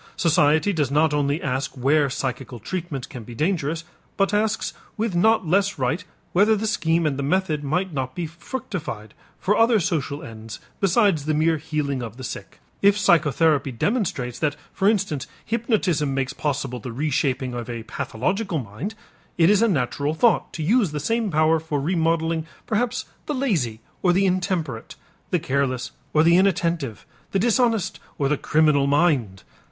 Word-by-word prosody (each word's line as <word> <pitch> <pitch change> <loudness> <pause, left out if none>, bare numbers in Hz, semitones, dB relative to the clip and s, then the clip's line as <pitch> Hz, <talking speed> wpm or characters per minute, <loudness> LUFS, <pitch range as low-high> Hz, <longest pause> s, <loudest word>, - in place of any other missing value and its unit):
Society 160 +3 +3
does 150 -6 0
not 150 +2 +3
only 145 +1 +1
ask 135 +1 -2
where 140 +3 +3
psychical 130 -1 -4
treatment 155 - -5
can 120 - -9
be 120 +2 -10
dangerous, 165 0 -1 0.3
but 195 +1 +2
asks 215 +1 0 0.2
with 220 -2 -1
not 220 +3 +3
less 195 +3 +2
right 135 +8 -1 0.3
whether 210 +4 +5
the 215 +1 -2
scheme 170 -6 +1
and 140 -2 0
the - - 0
method 155 0 0
might 175 +5 -1
not 130 -2 -3
be 175 - -2
fructified 165 - -6 0.3
for 205 - +2
other 225 0 +4
social 155 -3 -2
ends 110 - -9 0.2
besides 195 -5 +3
the 155 0 +1
mere 160 +1 +2
healing 150 -4 -2
of 115 -1 -7
the 130 - -8
sick. - - -7 0.2
If 200 +1 +5
psychotherapy 155 - +3
demonstrates 130 - -1
that 145 -2 0 0.2
for 195 - +3
instance 195 -10 -1 0.2
hypnotism 200 - 0
makes 135 0 -1
possible 140 -4 -2
the 120 +2 -6
reshaping 130 -1 -1
of 120 -1 -5
a 115 -2 -5
pathological 185 - -2
mind, 130 - -5 0.4
it 170 +2 +5
is 210 0 +4
a 230 - +5
natural 145 - 0
thought 230 +7 +3
to 160 - -4
use 200 -1 +2
the 150 - -2
same 225 +7 0
power 155 0 +3
for 155 -2 -2
remodeling 165 0 0 0.2
perhaps 240 +3 -1 0.2
the 295 - -1
lazy 160 - -1 0.2
or 180 -2 +4
the 195 +2 +3
intemperate, 180 - -1 0.3
the - - +2
careless 130 -2 -1 0.2
or 155 - +4
the 170 +1 +5
inattentive, 170 - 0 0.3
the - - +3
dishonest 230 -1 +1 0.2
or 140 - +1
the 150 - +2
criminal 150 -1 +3
mind. 140 - +1
155 Hz, 165 wpm, -23 LUFS, 135-195 Hz, 0.4 s, whether